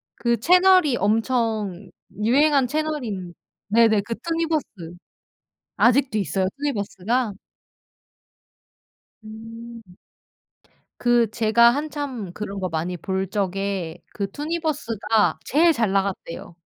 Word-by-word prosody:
그 235 Hz, -1 st, 0 dB
채널이 360 Hz, -, +5 dB
엄청 215 Hz, -3 st, -1 dB, 0.3 s
유행한 275 Hz, +3 st, +3 dB
채널인 245 Hz, -, -3 dB, 0.3 s
네네 220 Hz, 0 st, +4 dB
그 230 Hz, +3 st, -5 dB
투니버스. 330 Hz, 0 st, -1 dB, 1.1 s
아직도 250 Hz, -2 st, +3 dB
있어요, 190 Hz, -2 st, 0 dB
투니버스가? 225 Hz, -3 st, -2 dB, 1.9 s
음. 225 Hz, +2 st, -10 dB, 1.2 s
그 240 Hz, -2 st, +3 dB
제가 235 Hz, +1 st, +4 dB
한참 280 Hz, -, -4 dB
그런 200 Hz, -2 st, -5 dB
거 185 Hz, -1 st, -2 dB
많이 165 Hz, +3 st, -3 dB
볼 190 Hz, +3 st, -2 dB
적에 195 Hz, -3 st, -2 dB, 0.2 s
그 200 Hz, -2 st, -3 dB
투니버스가 290 Hz, -, -1 dB
제일 325 Hz, +4 st, +4 dB
잘 225 Hz, -6 st, 0 dB
나갔대요. 195 Hz, -4 st, -3 dB
225 Hz, 205 characters per minute, -23 LUFS, 200-280 Hz, 1.9 s, 채널이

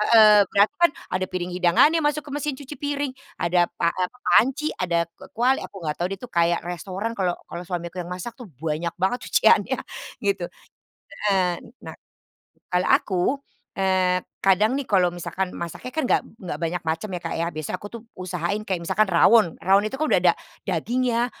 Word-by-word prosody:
heeh, 215 Hz, -2 st, +8 dB
ternyata 200 Hz, +7 st, +4 dB
kan 345 Hz, -2 st, +5 dB, 0.2 s
ada 185 Hz, 0 st, 0 dB
piring 180 Hz, -1 st, -4 dB
hidangannya 180 Hz, -, +4 dB
masuk 295 Hz, 0 st, +1 dB
ke 285 Hz, -, -8 dB
mesin 295 Hz, -1 st, -2 dB
cuci 280 Hz, +2 st, -9 dB
piring, 285 Hz, -2 st, -2 dB, 0.3 s
ada 175 Hz, 0 st, +2 dB
pa 170 Hz, -, +3 dB
eee, 180 Hz, -1 st, 0 dB
apa, 250 Hz, -, -22 dB
panci, 270 Hz, +5 st, +4 dB
ada 175 Hz, -2 st, 0 dB
k -, -, -44 dB, 0.2 s
kuali, 255 Hz, +3 st, +3 dB
aku -, -, -10 dB
nggak 150 Hz, -1 st, -2 dB
tahu 175 Hz, -, +1 dB
dia 195 Hz, -, -3 dB
itu 250 Hz, -, -8 dB
kayak 170 Hz, 0 st, +2 dB
restoran 190 Hz, +5 st, -4 dB
kalau 185 Hz, -4 st, 0 dB
kalau 170 Hz, +1 st, -6 dB
suamiku 175 Hz, -1 st, -4 dB
yang 175 Hz, -, -9 dB
masak 185 Hz, +6 st, -6 dB
tuh, 245 Hz, -, -9 dB
banyak 160 Hz, +2 st, -2 dB
banget 195 Hz, +7 st, +1 dB
cuciannya, -, -, +4 dB, 0.4 s
gitu. 195 Hz, -3 st, 0 dB, 0.9 s
Heeh, 180 Hz, -2 st, +1 dB
n -, -, -14 dB, 0.2 s
nah, -, -, -8 dB, 0.7 s
kalau 180 Hz, 0 st, +1 dB
aku, 185 Hz, -3 st, 0 dB, 0.6 s
eee, 185 Hz, -1 st, +2 dB, 0.2 s
kadang 210 Hz, +7 st, +3 dB
nih 280 Hz, -, -4 dB
kalau 185 Hz, -3 st, +3 dB
misalkan 180 Hz, +2 st, -3 dB
masaknya 170 Hz, +9 st, -6 dB
kan 315 Hz, -, 0 dB
nggak -, -, +3 dB, 0.2 s
nggak 175 Hz, -5 st, -5 dB
banyak 170 Hz, +2 st, -1 dB
macam 160 Hz, +6 st, -1 dB
ya 175 Hz, -, -3 dB
Kak -, -, -3 dB
ya, 170 Hz, -, 0 dB
biasanya 155 Hz, +3 st, -3 dB
aku 205 Hz, -, -6 dB
tuh 235 Hz, -, -8 dB
usahain 185 Hz, +3 st, -3 dB
kayak 185 Hz, -3 st, -1 dB
misalkan 215 Hz, -1 st, +2 dB
rawon, 180 Hz, +1 st, +5 dB
rawon 195 Hz, +3 st, +5 dB
itu 265 Hz, +5 st, -5 dB
kan 310 Hz, -, +1 dB
udah 180 Hz, -, +4 dB
ada -, -, -2 dB, 0.3 s
dagingnya, 235 Hz, +6 st, 0 dB
185 Hz, 190 wpm, -24 LUFS, 175-235 Hz, 0.9 s, heeh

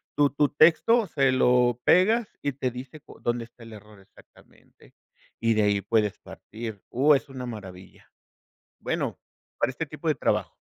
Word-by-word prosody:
tu 145 Hz, -1 st, +3 dB
tu 145 Hz, 0 st, +1 dB
texto, 185 Hz, +9 st, +4 dB
se 135 Hz, -4 st, +1 dB
lo 125 Hz, -1 st, +2 dB
pegas 220 Hz, +6 st, +4 dB, 0.2 s
y 145 Hz, -, 0 dB
te 130 Hz, -1 st, -2 dB
dice 130 Hz, +5 st, -9 dB
cu -, -, -16 dB
dónde 120 Hz, -1 st, -2 dB
está 120 Hz, 0 st, -18 dB
el 115 Hz, -1 st, -12 dB
error 105 Hz, -1 st, -14 dB
exactamente, 95 Hz, -, -22 dB, 0.5 s
y 115 Hz, -1 st, +1 dB
de 110 Hz, -, +2 dB
ahí 100 Hz, -1 st, +1 dB
puedes 105 Hz, -3 st, 0 dB
partir. 110 Hz, -2 st, -9 dB
Uh, 145 Hz, +4 st, +4 dB
es 140 Hz, -, -3 dB
una 130 Hz, -2 st, -7 dB
maravilla. 95 Hz, -5 st, -11 dB, 0.7 s
Bueno, -, -, -3 dB, 0.4 s
para -, -, +1 dB
este -, -, -5 dB
tipo -, -, -8 dB
de -, -, +3 dB
trabajo. -, -, -1 dB
125 Hz, 170 wpm, -26 LUFS, 110-145 Hz, 0.7 s, texto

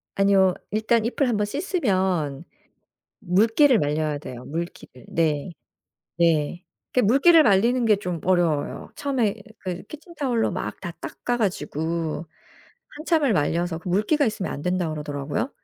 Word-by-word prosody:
아니요. 195 Hz, -2 st, +4 dB, 0.2 s
일단 220 Hz, +1 st, +1 dB
잎을 255 Hz, +3 st, 0 dB
1 230 Hz, -, +1 dB
번 210 Hz, -, +1 dB
씻으면 190 Hz, -, -1 dB, 0.8 s
물기를 225 Hz, -, +4 dB
말려야 150 Hz, -1 st, 0 dB
돼요 125 Hz, -4 st, -9 dB
물기를. 160 Hz, -6 st, -7 dB
네. 155 Hz, 0 st, 0 dB, 0.7 s
네. 165 Hz, 0 st, +1 dB, 0.3 s
그 255 Hz, -, +3 dB
물기를 280 Hz, -, +6 dB
말리는 235 Hz, +3 st, +3 dB
게 215 Hz, -2 st, +5 dB
좀 180 Hz, -4 st, -4 dB
어려워요. 175 Hz, -5 st, 0 dB
처음에 255 Hz, -8 st, 0 dB, 0.2 s
그 180 Hz, -2 st, -5 dB
키친타월로 285 Hz, -, -2 dB
막 -, -, -5 dB
다 175 Hz, -, -5 dB
닦아 245 Hz, 0 st, -3 dB
가지고 165 Hz, -5 st, -2 dB, 0.7 s
한참을 305 Hz, -5 st, +2 dB
말려서 170 Hz, +1 st, 0 dB
그 180 Hz, -, -7 dB
물기가 215 Hz, -, +2 dB
있으면 215 Hz, -4 st, -2 dB
안 145 Hz, -, -5 dB
된다 180 Hz, 0 st, 0 dB
그러더라고요. 150 Hz, -, -3 dB
190 Hz, 290 characters per minute, -24 LUFS, 160-235 Hz, 0.8 s, 물기를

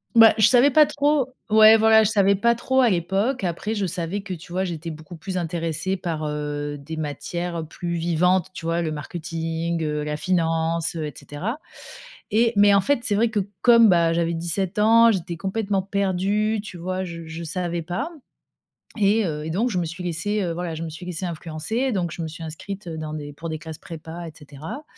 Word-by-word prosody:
Bah, 225 Hz, -1 st, +9 dB
je 215 Hz, -, +6 dB
savais 255 Hz, +4 st, +5 dB
pas 305 Hz, +2 st, +7 dB
trop. 290 Hz, -2 st, +1 dB, 0.2 s
Ouais, 220 Hz, +1 st, +8 dB
voilà, 220 Hz, 0 st, +6 dB
je 210 Hz, -, +2 dB
savais 200 Hz, -2 st, +3 dB
pas 235 Hz, +4 st, +3 dB
trop 260 Hz, +3 st, +1 dB
à 240 Hz, -, +5 dB
l'époque. 195 Hz, +6 st, 0 dB
Après 195 Hz, +6 st, -2 dB
je 205 Hz, -2 st, 0 dB
savais 175 Hz, +2 st, -3 dB
que, 195 Hz, -2 st, -6 dB
tu 175 Hz, 0 st, -10 dB
vois, 190 Hz, +1 st, 0 dB
j'étais 165 Hz, -1 st, -5 dB
beaucoup 155 Hz, +2 st, -10 dB
plus 185 Hz, +3 st, -5 dB
intéressée 170 Hz, +2 st, -2 dB
par, 165 Hz, -4 st, -3 dB
heu, 145 Hz, 0 st, -3 dB
des 155 Hz, +3 st, -8 dB
matières 165 Hz, +3 st, -4 dB
plus 170 Hz, +2 st, -5 dB
vivantes, 175 Hz, +2 st, +2 dB
tu 165 Hz, -, -8 dB
vois? 165 Hz, +1 st, 0 dB
Le 160 Hz, -, -2 dB
marketing, 165 Hz, +2 st, -3 dB
heu, 150 Hz, -1 st, -1 dB
la 150 Hz, 0 st, -3 dB
finance, 165 Hz, -1 st, 0 dB
heu 155 Hz, -, -2 dB
et 150 Hz, -, -6 dB
cetera 210 Hz, -, -5 dB, 0.7 s
et 230 Hz, +2 st, +3 dB
mais 205 Hz, 0 st, +6 dB
en 200 Hz, -, +6 dB
fait, 265 Hz, +6 st, +1 dB
c'est 205 Hz, -3 st, +1 dB
vrai 225 Hz, +2 st, +3 dB
que 215 Hz, -3 st, 0 dB, 0.2 s
comme, 235 Hz, -2 st, +7 dB
bah, 170 Hz, -2 st, +4 dB
j'avais 170 Hz, 0 st, 0 dB
17 175 Hz, +4 st, -2 dB
ans, 230 Hz, +2 st, +6 dB
j'étais 175 Hz, -4 st, -3 dB
complètement 195 Hz, +1 st, -1 dB
perdue, 200 Hz, +2 st, 0 dB
tu 185 Hz, -, -9 dB
vois? 185 Hz, +2 st, -3 dB
Je 170 Hz, -2 st, -7 dB
je 160 Hz, +1 st, -6 dB
savais 170 Hz, +1 st, -3 dB
pas 200 Hz, -, -3 dB, 0.9 s
et 210 Hz, +2 st, +3 dB
heu, 150 Hz, -2 st, -3 dB
et -, -, -4 dB
donc 215 Hz, +9 st, 0 dB
je 180 Hz, -, 0 dB
me 170 Hz, -, -1 dB
suis 175 Hz, +3 st, -6 dB
laissée, 185 Hz, +5 st, -1 dB
heu, 170 Hz, -, -1 dB
voilà, 170 Hz, -1 st, -4 dB
je 160 Hz, -, -5 dB
me 165 Hz, -, -4 dB
suis 160 Hz, +3 st, -9 dB
laissée 180 Hz, +1 st, -4 dB
influencer. 170 Hz, -, -3 dB
Donc 180 Hz, -6 st, -1 dB
je 170 Hz, -, -6 dB
me 160 Hz, -, -3 dB
suis 165 Hz, +1 st, -8 dB
inscrite 180 Hz, +5 st, -7 dB
dans 155 Hz, -2 st, -5 dB
des 145 Hz, -1 st, -7 dB
pour 165 Hz, +3 st, -7 dB
des 155 Hz, -, -3 dB
classes 160 Hz, -2 st, -8 dB
prépa 165 Hz, +1 st, -8 dB
et -, -, -8 dB
cetera 150 Hz, -, -8 dB
175 Hz, 210 wpm, -23 LUFS, 165-205 Hz, 0.9 s, Bah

